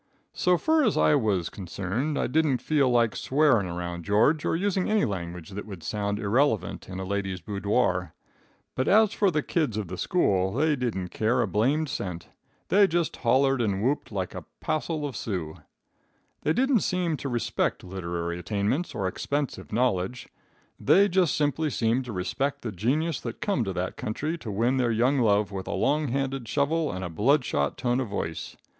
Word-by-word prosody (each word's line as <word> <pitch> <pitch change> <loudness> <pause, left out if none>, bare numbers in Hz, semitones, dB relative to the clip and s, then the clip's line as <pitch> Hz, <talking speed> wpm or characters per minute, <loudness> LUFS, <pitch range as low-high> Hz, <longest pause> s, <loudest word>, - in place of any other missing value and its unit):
"So 180 0 +2
fur 315 - +2
as 220 - +2
I - - +4
was 105 - +1
concerned, 100 - -3
I - - +1
didn't 150 0 +2
feel 140 -1 +2
like 120 -2 +2
swearing 130 -8 +2
around 85 0 -4
George 110 - +3
or - - +1
using 190 +2 0
any 215 -5 +3
language 90 -4 -5
that 100 +2 -6
would 95 -6 -9
sound 105 +1 -2
irrelevant 105 -3 0
in 95 0 -6
a 95 - -4
ladies' 95 -1 -2
boodore; 100 -2 0 0.6
but 130 - -1
as 215 0 +5
for 200 - +3
the 150 -4 0
kids 150 - 0
of 105 -5 -3
the 90 - -6
school, 95 - +1
they 150 +4 +2
didn't 110 -9 -2
care 120 +5 +1
a - - -1
blamed 135 - +1
cent. 90 - -5 0.4
They 200 0 +6
just 170 -1 -1
hollered 135 +2 +3
and 100 -3 0
whooped 135 +1 0
like 95 -3 -3
a - - -7
passle 155 -1 -2
of 140 -4 -5
Sioux. 90 -7 -4 0.8
"They 155 - +1
didn't 260 +1 +3
seem 180 -4 0
to 140 - -4
respect 120 -6 -1
literary 85 -2 -4
attainments 105 - -1
or 100 -4 -1
expensive 140 +8 -3
knowledge. 120 -1 0 0.5
They 200 +2 +5
just 180 -4 +2
simply 150 +1 0
seemed 120 0 0
to 120 - -6
respect 105 +9 -2
the 115 - -3
genius 135 - 0
that 115 -2 -6
come 200 - 0
to 95 - -3
that 90 0 -3
country 150 +9 -3
to 115 - -7
win 120 +6 +1
their 125 -2 +2
young 125 +5 +2
love 105 -3 +2
with 95 -1 -5
a - - -2
long 145 +9 +1
handled 135 -1 -2
shovel 150 +5 +1
and 95 0 -5
a - - -4
blood 125 - +2
shot 70 -7 -1
tone 120 0 0
of 130 - -2
voice. 80 -5 -4
120 Hz, 185 wpm, -27 LUFS, 95-150 Hz, 0.8 s, They